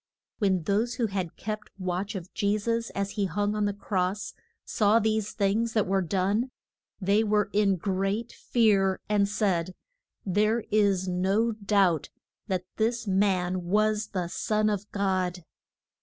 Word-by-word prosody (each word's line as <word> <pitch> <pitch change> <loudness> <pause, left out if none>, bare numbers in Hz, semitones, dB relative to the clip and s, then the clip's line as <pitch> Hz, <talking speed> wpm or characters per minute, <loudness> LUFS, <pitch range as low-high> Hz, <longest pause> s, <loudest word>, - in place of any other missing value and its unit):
When 190 -5 +2
those 215 +6 0
who 240 - 0
had 190 -5 -3
kept 215 0 -5
watch 185 +2 -3
of 185 -1 -7
Je 205 +1 +1
sus 230 +2 -1
as 200 0 -1
he 205 -1 -1
hung 205 +3 -1
on 210 -1 0
the 205 - +1
cross, 195 0 -2 0.3
saw 210 -1 +3
these 220 -1 0
things 220 +3 +1
that 215 -3 +2
were 195 +1 +1
done, 195 +7 0 0.5
they 200 +3 +3
were 210 -2 +1
in 200 -2 +3
great 195 +5 -1
fear, 200 -5 +2
and 205 -1 +2
said, 185 -4 0 0.5
There 210 +4 +2
is 200 -3 +2
no 190 +6 +1
doubt 200 -7 +1 0.4
that 185 -3 -1
this 230 +1 0
man 185 -2 +1
was 215 +3 +1
the 180 -4 -3
son 215 +4 0
of 205 0 -4
God. 185 -3 -1
200 Hz, 150 wpm, -27 LUFS, 190-215 Hz, 0.5 s, saw